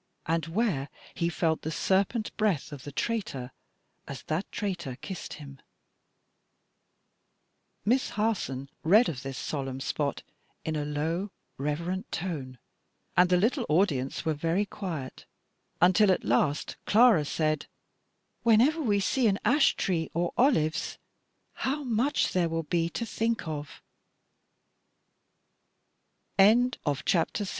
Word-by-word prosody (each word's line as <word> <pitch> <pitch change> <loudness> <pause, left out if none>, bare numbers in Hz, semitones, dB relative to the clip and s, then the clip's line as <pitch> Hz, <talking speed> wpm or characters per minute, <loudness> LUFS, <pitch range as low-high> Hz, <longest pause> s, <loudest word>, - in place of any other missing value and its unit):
and 165 -1 0
where 165 - 0 0.2
he 170 - 0
felt 160 -1 0
the 160 - -3
serpent 195 +7 0
breath 200 -11 0
of 140 -3 -9
the 145 - -6
traitor 140 - -3 0.6
as 140 - -7
that 160 +5 -3
traitor 175 - -3
kissed 190 -3 -6
him.'" 140 -3 -10 2.3
Miss 255 +5 +2
Harson 195 - -1
read 210 +9 +5
of 135 -6 -5
this 135 -1 -6
solemn 135 -3 -4
spot 140 +1 -2 0.4
in 160 - -1
a 150 -1 -1
low, 160 +7 -2 0.3
reverent 170 +6 -2
tone; 150 -8 -4 0.6
and 180 0 +5
the 180 - +4
little 240 - +1
audience 150 -6 +1
were 160 - +2
very 165 +7 0
quiet, 170 -10 -6 0.5
until 185 +3 +5
at 185 - +1
last 140 +6 +1
Clara 220 -7 +6
said, 155 0 -1 0.7
"Whenever 245 +8 +4
we 210 -7 +2
see 235 +5 +2
an 200 -2 +2
ash 275 +6 +4
tree 165 -4 -1
or 170 +1 0
olives, 165 - +2 0.6
how 290 +3 -2
much 250 +4 +1
there 175 -2 +2
will 165 0 -2
b 165 +1 0
170 Hz, 115 wpm, -28 LUFS, 150-210 Hz, 2.3 s, Clara